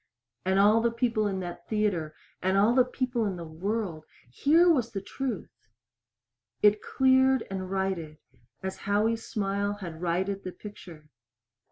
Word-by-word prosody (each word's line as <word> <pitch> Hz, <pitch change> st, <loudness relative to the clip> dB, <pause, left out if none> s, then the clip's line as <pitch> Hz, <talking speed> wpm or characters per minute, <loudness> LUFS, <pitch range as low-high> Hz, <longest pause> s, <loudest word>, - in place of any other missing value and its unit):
And 190 Hz, +1 st, +2 dB
all 210 Hz, +3 st, +5 dB
the 235 Hz, -, +3 dB
people 230 Hz, -2 st, 0 dB
in 190 Hz, -2 st, -2 dB
that 175 Hz, -1 st, -7 dB
theater, 195 Hz, -8 st, 0 dB, 0.3 s
and 190 Hz, +1 st, +1 dB
all 210 Hz, +4 st, +4 dB
the 255 Hz, 0 st, +6 dB
people 250 Hz, -1 st, -2 dB
in 190 Hz, -, -2 dB
the 170 Hz, -1 st, -7 dB
world 175 Hz, 0 st, -3 dB, 0.3 s
here 320 Hz, -, +4 dB
was 250 Hz, -9 st, +2 dB
the 195 Hz, -, -2 dB
truth! 260 Hz, +6 st, -6 dB, 1.0 s
It 210 Hz, 0 st, +5 dB
cleared 260 Hz, -1 st, +3 dB
and 185 Hz, -1 st, -4 dB
righted 190 Hz, -5 st, -2 dB, 0.5 s
as 190 Hz, 0 st, -4 dB
Howie's 215 Hz, +3 st, 0 dB
smile 200 Hz, 0 st, -1 dB
had 170 Hz, -5 st, -8 dB
righted 190 Hz, +3 st, -1 dB
the 185 Hz, -, -6 dB
picture. 170 Hz, -7 st, -12 dB
200 Hz, 150 wpm, -28 LUFS, 185-230 Hz, 1.0 s, the